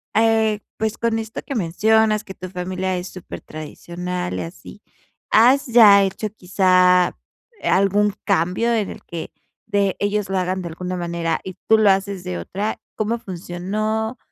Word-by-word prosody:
eh, 220 -1 +3 0.2
pues, 220 0 -2
con 230 -1 0
esto 220 0 -6
que 275 - -4
mencionas 215 +3 +2
que 190 - -9
tu 185 - -8
familia 185 +1 -3
es 180 +1 -5
supertradicional 180 +1 -6
y - - -2
así. 180 +4 -11 0.5
¿Has 255 +6 +5
ya 215 -4 +7
hecho 195 +3 -2
quizá 185 -2 +3 0.5
algún 200 +2 +3
cambio 195 +5 +1
en 215 -4 0
el - - -9
que, 170 -2 -6 0.4
de 200 -2 +1
ellos 205 -1 -1
lo 195 - 0
hagan 185 +1 -1
de 175 - -5
alguna 180 +2 -5
manera 170 -1 -2
y 185 - -6
tú 220 - +6
lo 215 -2 +5
haces 195 -1 0
de 90 -1 -4
otra? 200 - -3 0.2
¿Cómo 220 +2 -1
funcionó? 210 +5 -3
195 Hz, 155 wpm, -21 LUFS, 180-215 Hz, 0.5 s, ya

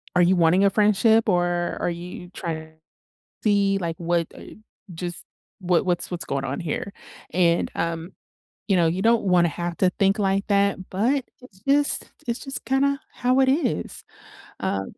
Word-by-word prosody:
are 180 - +5
you 180 +2 +4
wanting 175 +3 +4
a - - +6
friendship, 215 +2 +3
or 175 -1 0
are - - 0
you 175 +1 -7
try 160 -2 -5 0.7
see, 200 -2 +3
like, 165 -2 -3
what, 170 -1 0
uh, - - -11 0.5
just 175 +1 -6 0.4
what 180 -1 +1
what's 175 -1 0
what's 175 - -4
going 135 0 -2
on 135 +1 -3
here? 170 +4 -3 0.4
And, 170 0 +2
um, 165 +2 -3 0.6
you 195 - +3
know, 170 -2 +4
you 175 +4 0
don't 230 -1 +3
wanna 175 -2 +4
have 170 +2 -4
to 185 - +3
think 195 +2 +3
like 195 0 +1
that, 200 -2 +1
but 245 +8 +1 0.2
it's 200 -7 -17
just 285 +1 +2
it's 235 0 -2
just 270 0 -5
kinda 275 +1 +1
how 255 +2 +1
it 265 - +4
is. 265 - -1 0.6
Uh 95 - -1
185 Hz, 170 wpm, -24 LUFS, 170-210 Hz, 0.7 s, a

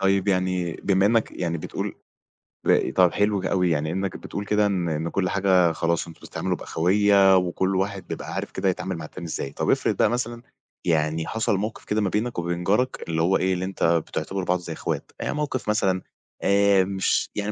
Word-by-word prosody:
طيب، 95 0 +2
يعني 90 -2 0
بما 95 +3 +2
إنّك 115 0 +2
يعني 85 -2 -2
بتقول - - -4 0.7
باقي - - +3
طَب 90 -2 +4
حلو 105 -1 +1
ك - - -5
أوي 90 -2 +2
يعني 80 -1 0
إنّك 95 +1 -2
بتقول 100 - -6
كده 105 0 +2
إن 95 -4 0
إن 80 +1 -2
كل 90 0 0
حاجة 95 -3 +3
خلاص 85 +1 -1
أنتم 85 - -13
بتتعاملوا - - -3
بأخويّة 95 +2 +4
وكل 95 +1 0
واحد 95 0 -2
بيبقى - - -6
عارف - - -4
كده 95 0 0
يتعامل 95 0 -3
مع 80 - -6
التاني 85 +3 -9
إزاي. 70 -3 -4
طَب - - -2
افرض - - +2
بقى 110 - +4
مثلًا 120 0 -2 0.4
يعني 80 -1 +1
حصل 110 -3 0
موقِف 110 +3 -4
كده 105 +1 0
ما 100 - +1
بينك 110 +2 -1
وبين 85 0 -2
جارك 105 +8 +1
اللي 80 -1 0
هو 90 +4 +3
إيه، 95 0 +1
اللي 90 0 -2
أنت 95 0 -4
بتعتبروا 85 +3 0
بعض 90 0 +1
زي 85 -1 -6
إخوات، - - -4
يعني - - -2
موقف 145 -6 -2
مثلًا 95 -3 +1 0.4
آآ 100 -1 +4
مش 95 0 0
يعني 105 0 -2
95 Hz, 200 wpm, -24 LUFS, 85-100 Hz, 0.7 s, طَب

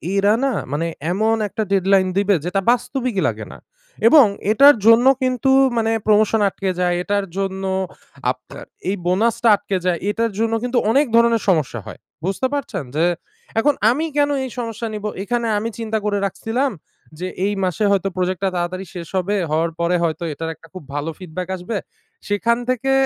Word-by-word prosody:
এরা 200 +2 +4
না 270 - +1 0.2
মানে 165 +3 -1 0.2
এমন 220 +4 +2
একটা 220 +2 -3
deadline 190 -1 +3
দিবে 200 0 +3
যেটা 180 +2 0
বাস্তবিকই 245 -3 -1
লাগে - - -3
না। - - -11 0.5
এবং 290 +1 +8 0.3
এটার 280 +6 +7
জন্য 230 +2 +7 0.2
কিন্তু 255 0 +1 0.3
মানে 225 0 +1 0.2
প্রমোশন 215 +1 +3
আটকে 195 0 -3
যায়। 180 -1 +1
এটার 200 0 0
জন্য 195 0 -2 0.7
আপনার - - -11 0.2
এই 200 - 0
বোনাসটা 230 +5 +2
আটকে 200 -2 -3
যায়। 175 -2 +1
এটার 230 +1 0
জন্য 225 0 +1
কিন্তু 245 0 -1
অনেক 280 +5 +4
ধরনের 235 -1 +4
সমস্যা 150 -9 +1
হয়। - - -9 0.3
বুঝতে 195 +8 0
পারছেন? 280 - -3
যে 160 +3 +3 0.5
এখন 290 +5 +3 0.2
আমি 305 +6 -1
কেন 290 0 +3 0.2
এই 260 - -6
সমস্যা 230 0 -4
নিব? 210 0 -5 0.2
এখানে 235 +2 -1
আমি 220 +2 -2
চিন্তা 220 -1 -1
করে 205 -1 +1
রাখছিলাম 225 +8 -1 0.5
যে 185 - -3 0.2
এই 205 - 0
মাসে 185 +3 -1
হয়তো 195 -1 +1
প্রোজেক্টটা 185 +1 0
তাড়াতাড়ি 180 +2 -3
শেষ 170 -2 -6
হবে। 195 +3 0 0.2
হওয়ার 165 +2 +1
পরে 170 +1 +1
হয়তো 165 0 -1
এটার 165 +2 -5
একটা 165 - -18
খুব 185 -5 -9
ভালো 145 +3 -2
ফিডব্যাক 180 0 -6
আসবে। 195 +4 -4 0.5
সেখান 225 +3 +1
থেকে 255 +1 0
205 Hz, 170 wpm, -20 LUFS, 185-235 Hz, 0.7 s, এবং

